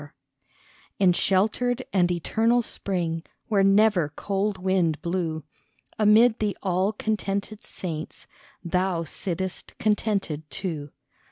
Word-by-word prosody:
88 145 Hz, -, -10 dB
SHELTERED 145 Hz, -, -29 dB, 0.8 s
In 185 Hz, -3 st, +4 dB
sheltered 225 Hz, +8 st, +1 dB
and 180 Hz, -2 st, +3 dB
eternal 225 Hz, +8 st, +2 dB
spring, 170 Hz, -6 st, -2 dB, 0.3 s
Where 200 Hz, -3 st, +3 dB
never 195 Hz, -5 st, +4 dB
cold 200 Hz, 0 st, -1 dB
wind 180 Hz, -4 st, +1 dB
blew, 170 Hz, -3 st, -2 dB, 0.6 s
Amid 220 Hz, +2 st, +5 dB
the 210 Hz, -2 st, -1 dB
all 190 Hz, +1 st, +1 dB
contented 210 Hz, -1 st, -3 dB
saints, 160 Hz, -4 st, -6 dB, 0.4 s
Thou 180 Hz, -1 st, 0 dB
sittest, 185 Hz, +3 st, -4 dB
contented 200 Hz, -8 st, -1 dB
too. 160 Hz, -7 st, -4 dB
190 Hz, 110 wpm, -25 LUFS, 170-210 Hz, 0.8 s, Amid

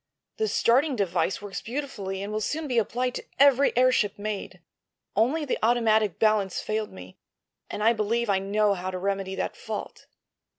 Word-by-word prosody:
The 440 Hz, -, 0 dB
starting 270 Hz, -, +2 dB
device 190 Hz, -1 st, -1 dB
works 205 Hz, -1 st, -5 dB
beautifully 225 Hz, -7 st, -4 dB
and 205 Hz, +1 st, -5 dB
will 215 Hz, -, -1 dB
soon 305 Hz, +7 st, -2 dB
be 245 Hz, -3 st, +2 dB
applied 245 Hz, +3 st, -1 dB
to -, -, -6 dB
every 280 Hz, 0 st, +5 dB
airship 250 Hz, -5 st, +3 dB
made. 205 Hz, -3 st, -5 dB, 0.6 s
Only 270 Hz, +9 st, +2 dB
the 270 Hz, -, -2 dB
automatic 220 Hz, -4 st, +2 dB
balance 215 Hz, -4 st, +2 dB
failed 215 Hz, 0 st, -3 dB
me, 95 Hz, 0 st, -12 dB, 0.5 s
and 210 Hz, -, -4 dB
I 230 Hz, +2 st, +5 dB
believe 230 Hz, +2 st, 0 dB
I 195 Hz, -2 st, +2 dB
know 205 Hz, +1 st, +2 dB
how 185 Hz, -1 st, -4 dB
to 185 Hz, -, -4 dB
remedy 195 Hz, 0 st, -2 dB
that -, -, -3 dB
fault." -, -, -7 dB
215 Hz, 170 wpm, -26 LUFS, 195-245 Hz, 0.6 s, every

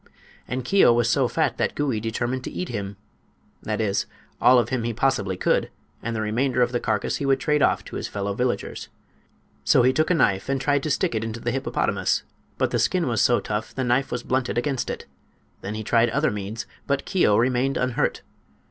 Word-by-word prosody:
And 125 Hz, +1 st, -3 dB
Keo 195 Hz, -5 st, +5 dB
was 120 Hz, 0 st, +2 dB
so -, -, +3 dB
fat -, -, 0 dB
that -, -, 0 dB
Gouie 135 Hz, -7 st, 0 dB
determined 120 Hz, +3 st, -2 dB
to -, -, -5 dB
eat 180 Hz, -, -4 dB
him—that 105 Hz, 0 st, -8 dB
is, 105 Hz, -3 st, 0 dB, 0.3 s
all 125 Hz, -, +7 dB
of 120 Hz, -, +2 dB
him 130 Hz, -2 st, -1 dB
he 115 Hz, 0 st, -2 dB
possibly 100 Hz, -7 st, 0 dB
could, -, -, +1 dB, 0.3 s
and 115 Hz, 0 st, -3 dB
the 110 Hz, -, -1 dB
remainder 125 Hz, +4 st, +1 dB
of 120 Hz, -, 0 dB
the 120 Hz, -, 0 dB
carcass 110 Hz, -4 st, -1 dB
he 140 Hz, -, -3 dB
would 135 Hz, 0 st, +3 dB
trade 150 Hz, +2 st, +1 dB
off -, -, +2 dB
to -, -, -6 dB
his -, -, -4 dB
fellow 100 Hz, 0 st, -3 dB
villagers. 125 Hz, +4 st, -2 dB, 0.7 s
So 125 Hz, -, +4 dB
he 130 Hz, +1 st, +4 dB
took 155 Hz, +5 st, +1 dB
a 180 Hz, -, +3 dB
knife 100 Hz, -7 st, +1 dB
and 135 Hz, 0 st, +1 dB
tried 145 Hz, +1 st, +1 dB
to 155 Hz, -, -3 dB
stick 140 Hz, -, +1 dB
it 110 Hz, -1 st, -1 dB
into 115 Hz, 0 st, -4 dB
the 120 Hz, -, -2 dB
hippopotamus, 135 Hz, +1 st, 0 dB, 0.3 s
but -, -, 0 dB
the -, -, +1 dB
skin -, -, +1 dB
was -, -, +1 dB
so -, -, +4 dB
tough 105 Hz, +1 st, -4 dB
the 130 Hz, -, -1 dB
knife 125 Hz, +2 st, +1 dB
was 120 Hz, 0 st, -3 dB
blunted 130 Hz, -1 st, -1 dB
against 130 Hz, 0 st, -1 dB
it. -, -, -5 dB, 0.6 s
Then 100 Hz, +2 st, -5 dB
he 110 Hz, -, -4 dB
tried 115 Hz, +2 st, +3 dB
other 145 Hz, +2 st, +1 dB
means; 105 Hz, +2 st, -5 dB, 0.2 s
but 140 Hz, -1 st, 0 dB
Keo 180 Hz, -, +3 dB
remained 125 Hz, +3 st, +1 dB
unhurt. 125 Hz, -1 st, 0 dB
120 Hz, 210 wpm, -24 LUFS, 110-135 Hz, 0.7 s, all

